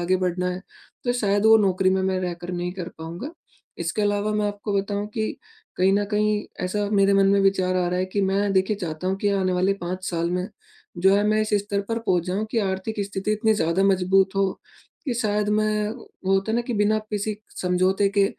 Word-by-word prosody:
आगे 180 +2 +2
बढ़ना 180 0 -1
है 180 - -4 0.5
तो 245 - +1
शायद 205 -4 +1
वो 220 0 +8
नौकरी 190 -2 +2
में 190 - +2
मैं 190 0 0
रहकर 175 -1 -4
नहीं 175 0 -3
कर 180 -2 -6
पाऊँगा, 170 - -6 0.5
इसके 170 +5 -2
अलावा 205 +1 +1
मैं 210 0 +1
आपको 205 +1 -5
बताऊँ 200 +1 -2
कि, 220 -1 -2 0.4
कहीं 190 +1 +3
न 205 +1 +2
कहीं 210 0 +1 0.2
ऐसा 205 +3 -1
मेरे 200 -1 +4
मन 195 0 +4
में 200 0 +4
विचार 185 -2 +2
आ 180 -1 +1
रहा 180 +1 -1
है 185 - +1
कि 200 +2 -2
मैं 195 +1 +1
देखिए 190 +2 +2
चाहता 175 -2 -5
हूँ, 190 - 0
कि 205 +1 0
आने 190 -2 +1
वाले 185 +2 +2
5 185 0 -5
साल 170 0 -1
में 180 +2 -2 0.5
जो 190 +2 +5
है 205 - +2
मैं 215 +1 +2
इस 215 - -1
स्तर 200 0 0
पर 230 0 -1
पहुँच 180 -6 +1
जाऊँ 195 +4 -1
कि 230 - 0
आर्थिक 190 +1 -2
स्थिति 200 +1 -2
इतनी 215 +1 +2
ज़्यादा 170 0 +1
मजबूत 190 0 +3
हो 195 -1 +2 0.5
कि 255 - -1
शायद 210 -3 0
मैं 210 0 +1
वो 195 -5 -3
होता 195 +3 0
है 230 - +2
ना 240 - +1
कि 240 -1 -4
बिना 210 +1 +2
किसी 210 0 -2 0.2
समझौते 185 +2 +2
के 200 - +6
195 Hz, 220 wpm, -24 LUFS, 185-210 Hz, 0.5 s, वो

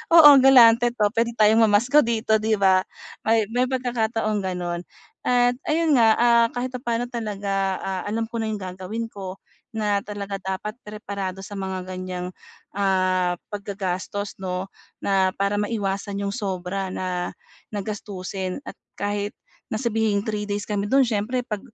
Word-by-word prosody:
oo, 310 -3 +11
galante 240 -3 +7
'to. 210 -4 +1
Puwede 230 +1 +1
tayong 220 +1 +5
mamasko 235 +8 +5
dito." 220 -1 +1
'Di 220 -1 +1
ba? 190 -1 +5 0.4
May 220 -1 +3
may 250 +1 +3
pagkakataong 225 -4 -1
gano'n. 175 -2 -3 0.5
At 245 0 +3
ayun 315 -1 +3
nga, 225 -1 +6
ah, 235 -1 +5
kahit 250 +1 -3
papano 240 -1 -2
talaga, 200 -4 -2
ah, 190 -1 -3
alam 225 +2 -1
ko 230 - -4
na 220 - -1
'yong 210 - -3
gagawin 190 +5 -5
ko, 190 -1 -7 0.4
na 210 -2 +1
talaga 200 -1 -5
dapat 190 +3 -4
preparado 200 -3 -5
sa 205 - -8
mga 190 -1 -4
ganyang, 185 -1 -5 0.4
ah, 185 -2 +2 0.2
paggagastos 200 0 -4
'no? 185 0 -3 0.4
Na 190 -1 +2
para 200 +1 0
maiwasan 200 -2 -2
'yong 200 +1 -2
sobra 190 -2 -3
na 180 -1 -3 0.4
na 205 - -3
gastusin 190 -1 -5
at - - -7 0.2
kahit 205 0 -2 0.4
na - - -1
sabihing 220 -4 +1
3 210 -2 -2
days 205 0 -2
kami 205 -1 -1
do'n, 270 0 +6
siyempre 230 +3 -1
'pag 210 -2 -3
205 Hz, 150 wpm, -24 LUFS, 190-230 Hz, 0.5 s, oo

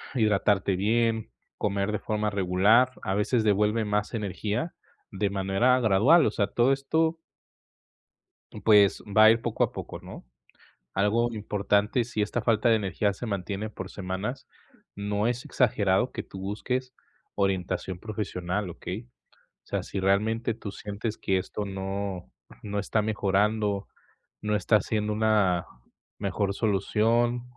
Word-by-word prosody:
hidratarte 105 -4 +2
bien, 115 +3 +1 0.3
comer 100 0 -1
de 105 - -2
forma 105 0 -1
regular, 100 +6 +3
a 95 - -1
veces 110 +3 +1
devuelve 105 +1 +2
más 105 +1 -1
energía 105 - -3 0.4
de 100 0 -1
manera 100 +6 +2
gradual, 120 - +5
o - - +2
sea, 100 -1 0
todo 120 +6 +3
esto 160 +4 0 1.5
pues, 105 -3 +5
va 110 +2 +6
a 110 - +9
ir 115 0 +1
poco - - 0
a - - 0
poco, - - -7
¿no?, - - -10 0.7
algo 105 +5 +2
importante, 105 +2 0
si 110 -3 -3
esta 105 +3 -1
falta 115 0 +2
de 115 - +5
energía 100 0 0
se 110 - -7
mantiene 100 0 -3
por 95 -3 -8
semanas, 100 +7 -5 0.5
no 105 +1 -1
es 120 0 -2
exagerado 105 -2 +1
que - - -4
tú 95 - -10
busques 125 +6 -3 0.4
orientación 95 -2 -1
profesional, 100 -3 -3
¿okey?, 95 +6 -7 0.6
o - - -26
sea, - - -1
si 100 - -5
realmente 110 +4 +1
tú 110 -2 -7
sientes 105 +2 -5
que 95 -1 +1
esto 105 +3 -4
no 95 -1 -4 0.3
no 105 -1 -3
está 105 +2 0
mejorando, 105 -1 0 0.5
no 105 0 -1
está 105 +2 +3
haciendo 105 +1 -1
una 105 -5 +2 0.5
mejor 100 0 -1
solución 115 +4 +1
105 Hz, 140 wpm, -27 LUFS, 100-115 Hz, 1.5 s, a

